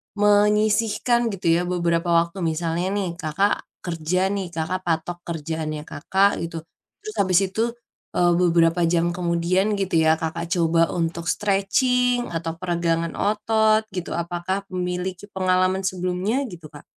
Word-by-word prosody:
menyisihkan 210 +3 +3
gitu 190 -3 -4
ya, 170 +1 +3
beberapa 170 -1 0
waktu 170 +3 +1
misalnya 165 +1 -1
nih, 195 -3 -1
Kakak 180 +6 0 0.2
kerja 180 +3 -1
nih, 195 -2 -2
Kakak 165 +4 -2
patok 165 +1 -1
kerjaannya 155 -2 -4
Kakak, 190 +7 +1 0.2
gitu. 165 -1 -7 0.4
Terus 430 0 -7
habis 185 -2 +4
itu 195 +4 -2 0.5
e - - +1 0.2
beberapa 170 -1 +3
jam 170 0 +1
kemudian 180 +4 0
gitu 195 -3 -1
ya, 160 0 +4
Kakak 165 +1 -4
coba 165 -1 +2
untuk 170 0 -2
stretching 245 +6 +1
atau 165 0 -3
peregangan 170 -1 -1
otot 220 +1 +2
gitu. 180 -2 -4
Apakah 175 +3 -3
memiliki 180 +1 -3
pengalaman 185 0 +1
sebelumnya 185 +6 -1
gitu, 165 -7 -11
Kak? 145 - -12
180 Hz, 135 wpm, -23 LUFS, 165-195 Hz, 0.5 s, habis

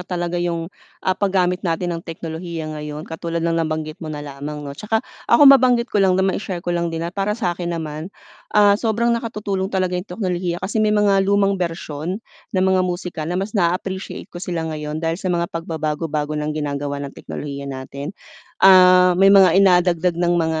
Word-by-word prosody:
talaga 175 -1 -3
'yung, 170 0 -3 0.3
ah, 185 - +3
paggamit 185 -2 +1
natin 175 0 -1
ng 165 - -4
teknolohiya 165 -1 -6
ngayon 150 0 -6
katulad 165 +1 -4
ng 170 - +1
nabanggit 155 +1 -3
mo 160 - -6
na 150 -1 -5
lamang 145 +1 -7
'no. 140 - -6
'Tsaka 220 +8 -2 0.2
ako 235 +5 +6
mabanggit 250 -3 +6
ko 205 - +3
lang 185 -1 +4
na 190 - +2
mai-share 190 -2 -2
ko 175 - -1
lang 170 0 0
din 165 0 -4
at 170 - -4
para 205 +2 -1
sa 190 -7 0
akin 175 0 -5
naman, 155 +1 -5 0.5
ah, 205 -1 +7
sobrang 230 +2 +1
nakatutulong 210 -5 -2
talaga 185 -2 -1
'yung 180 +2 -3
teknolohiya 180 -2 -2
kasi 210 +3 -1
may 215 - +3
mga 205 -2 +3
lumang 200 -1 +2
bersyon 165 +3 -4 0.3
ng 185 - +3
mga 190 -1 +3
musika 175 -3 -3
na 175 - -2
mas 195 +3 -3
naa-appreciate 190 0 -2
ko 175 - -7
sila 175 -3 -3
ngayon 150 +1 -4
dahil 165 +3 -1
sa 190 - -2
mga 170 -1 -1
pagbabago-bago 155 -2 -3
ng 150 0 -2
ginagawa 145 -1 -3
ng 140 - -7
teknolohiya 140 -1 -7
natin. 140 +5 -7 0.4
Ah, 185 -1 +7
may 195 - +7
mga 195 -2 +7
i 195 - +5
nadagdag 180 -2 +3
ng 175 0 +1
mga 160 -1 0
175 Hz, 190 wpm, -20 LUFS, 160-195 Hz, 0.5 s, ah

